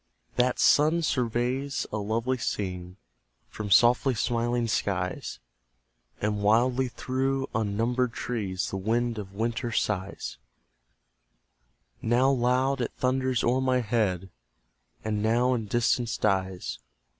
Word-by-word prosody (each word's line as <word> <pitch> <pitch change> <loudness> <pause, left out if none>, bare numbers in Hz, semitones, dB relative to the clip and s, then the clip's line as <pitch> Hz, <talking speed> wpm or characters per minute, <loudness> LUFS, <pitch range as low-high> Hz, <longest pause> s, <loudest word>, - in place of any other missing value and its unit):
That 125 0 +2
sun 155 +3 +4
surveys 125 +1 -1
a 105 - -2
lovely 115 +5 -1
scene 90 -4 -4 0.5
From 105 -1 -6
softly 120 +6 +5
smiling 120 +1 0
skies; 95 -4 -2 0.8
And 105 0 -1
wildly 120 +5 +3
through 135 +2 -1
unnumbered 115 +4 0
trees 100 -7 -3
The 95 - -2
wind 115 +3 0
of 100 -2 -8
winter 120 +2 -2
sighs: 100 - -2 1.6
Now 125 +4 +3
loud, 130 +1 +1
it 120 - -2
thunders 130 -1 +1
o'er 125 +2 +2
my 130 -1 +2
head, 100 -5 -1 0.7
And 105 -1 -1
now 120 +4 +2
in 115 -4 -2
distance 120 +1 +1
dies. 95 -3 -1
120 Hz, 110 wpm, -27 LUFS, 105-125 Hz, 1.6 s, softly